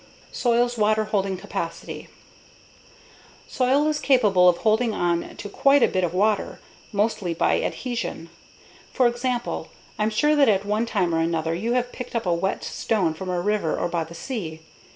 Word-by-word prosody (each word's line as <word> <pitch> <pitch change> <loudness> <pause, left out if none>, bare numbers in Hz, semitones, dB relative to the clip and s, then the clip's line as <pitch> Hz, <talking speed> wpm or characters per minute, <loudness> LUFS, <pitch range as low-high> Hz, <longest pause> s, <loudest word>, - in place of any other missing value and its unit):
Soil's 240 -1 +1
Water 215 +1 +3
Holding 195 -3 -1
Capacity 190 -3 -6 1.4
Soil 265 +3 +2
is 305 -1 0
capable 210 -11 +4
of 175 - +2
holding 220 +2 +1
on 170 -1 -1
to 205 - -6
quite 275 +6 +3
a - - +6
bit 185 - -1
of 175 - 0
water, 205 +4 0 0.3
mostly 205 -4 -1
by - - +2
adhesion. 230 -9 -4 0.6
For 255 - +2
example, 240 0 -1 0.3
I'm 210 +1 +2
sure 295 +8 +2
that 280 -5 +5
at 200 -1 +2
one 215 +3 0
time 185 -7 0
or 165 - +1
another 165 0 0
you 220 +8 -1
have 245 0 0
picked 250 -1 -8
up 230 - -1
a 175 - +2
wet 190 +3 -1
stone 190 -8 0
from 185 +3 -7
a 180 -1 0
river 205 -3 0
or - - 0
by 170 -1 -1
the 165 +1 -11
sea. 165 -7 -5
210 Hz, 175 wpm, -24 LUFS, 175-240 Hz, 1.4 s, a